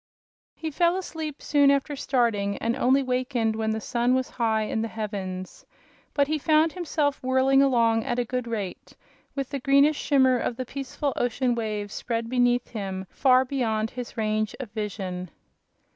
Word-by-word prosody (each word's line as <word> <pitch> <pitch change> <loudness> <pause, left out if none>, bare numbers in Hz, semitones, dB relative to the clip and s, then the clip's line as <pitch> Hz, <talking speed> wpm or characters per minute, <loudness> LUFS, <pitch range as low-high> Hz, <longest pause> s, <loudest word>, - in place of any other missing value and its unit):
He 320 -1 -5
fell 345 +4 +2
asleep 320 -5 -6
soon 285 -1 +4
after 280 +1 +1
starting, 230 -7 0
and 230 +1 -1
only 265 +1 +3
wakened 250 -3 0
when 220 0 -1
the 220 0 -1
sun 240 +3 +1
was 260 -1 -1
high 220 -2 +1
in 220 +1 -2
the 225 - -1
heavens. 195 -4 -5 0.5
But 285 - +4
he 310 +1 0
found 310 +2 +3
himself 305 -5 -1
whirling 260 +1 +3
along 230 -4 +3
at 240 - -2
a 245 - 0
good 250 0 -3
rate, 210 -5 -5 0.4
with 275 -2 -3
the 280 - -2
greenish 280 +3 +4
shimmer 260 -3 +3
of 235 - -2
the 255 - -3
peaceful 275 +2 -3
ocean 245 +1 +1
waves 215 -3 -3
spread 230 -1 -3
beneath 245 -1 +2
him 195 -4 -4
far 260 -1 +4
beyond 225 -5 -1
his 245 -2 -7
range 215 -1 0
of 250 -6 -7
vision. 190 -4 -4
245 Hz, 170 wpm, -26 LUFS, 220-275 Hz, 0.5 s, soon